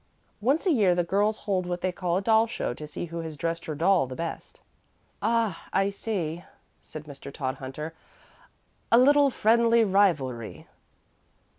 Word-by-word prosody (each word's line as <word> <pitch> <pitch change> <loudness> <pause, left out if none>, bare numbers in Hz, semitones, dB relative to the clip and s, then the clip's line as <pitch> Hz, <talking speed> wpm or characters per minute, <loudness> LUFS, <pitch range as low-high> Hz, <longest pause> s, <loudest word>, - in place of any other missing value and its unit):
Once 270 - +1
a 370 - +3
year 200 - +3
the 175 - +1
girls 205 +5 +1
hold 185 -3 -2
what 175 0 -3
they 185 - 0
call 175 0 -1
a - - -1
doll 220 +1 +4
show 225 - -3
to 150 +4 -9
see 150 - -5
who 170 0 -6
has 160 -2 -6
dressed 165 +2 -3
her 155 - -4
doll 175 -2 +3
the 130 - -7
best." 165 +2 -6 0.6
"Ah, 225 -7 0
I 195 +1 +1
see," 180 -5 -3 0.4
said 155 - -9
Mr. 140 -2 -10
Todhunter; 135 +3 -5 1.0
"a 230 - +7
little 285 +3 +5
friendly 230 0 +3
rivalry." 155 - 0
180 Hz, 160 wpm, -26 LUFS, 155-220 Hz, 1.0 s, a